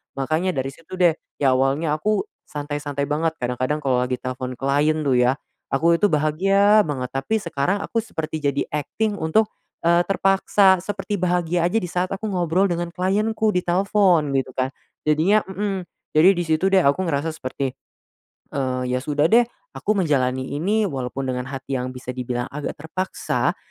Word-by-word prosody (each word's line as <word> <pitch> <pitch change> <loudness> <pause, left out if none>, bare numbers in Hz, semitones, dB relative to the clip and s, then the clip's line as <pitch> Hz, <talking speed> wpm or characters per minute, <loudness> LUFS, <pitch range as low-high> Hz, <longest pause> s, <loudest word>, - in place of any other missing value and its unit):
Makanya 155 +7 0
dari 135 -1 -2
situ 165 +5 -14
deh, 175 -3 +3 0.2
ya 135 -2 +4
awalnya 145 +4 +1
aku 210 +5 +1 0.3
santai-santai 145 -1 -4
banget, 160 +2 0
kadang-kadang 130 +5 -1
kalo 130 -2 +2
lagi 125 - -1
telpon 130 0 -4
klien 145 +4 +1
tuh 130 -3 +2
ya, 125 +1 +4 0.4
aku 170 +4 +4
itu 210 - +4
bahagia 195 +7 +3
banget. 130 -4 -3
Tapi 170 +12 -1
sekarang 175 +5 -1
aku - - -4
seperti 160 -7 -4
jadi 140 -1 0
akting 205 +8 -2
untuk, 205 +7 +2 0.3
eee, 170 +1 +4
terpaksa, 195 0 +3
seperti 200 +2 -4
bahagia 175 -1 +1
aja 180 - -3
di 180 -6 0
saat 180 +1 0
aku 195 +3 -7
ngobrol 180 0 +1
dengan 175 0 -1
klienku 210 +5 0
di 180 - +1
telpon, 180 -4 +3
gitu 135 -1 -1
kan. 130 0 -1 0.3
Jadinya 165 +8 +3
mmm, 195 0 -3 0.3
jadi 170 +5 +7
di 175 -2 -1
situ 160 +5 +2
deh 195 - +6
aku 145 +2 +2
ngerasa 160 -1 -1
seperti, 130 -2 -4 0.8
eee, 130 -2 -1
ya 125 - 0
sudah 145 +2 +1
deh 240 +1 +7 0.3
aku 215 - -1
menjalani 130 -3 0
ini 205 +9 +1
walaupun 135 -5 -3
dengan 125 0 -3
hati 135 0 -5
yang 125 - -3
bisa 125 0 -6
dibilang 125 -1 -3
agak 145 +1 -4
terpaksa, 185 +5 -2
155 Hz, 165 wpm, -22 LUFS, 135-190 Hz, 0.8 s, jadi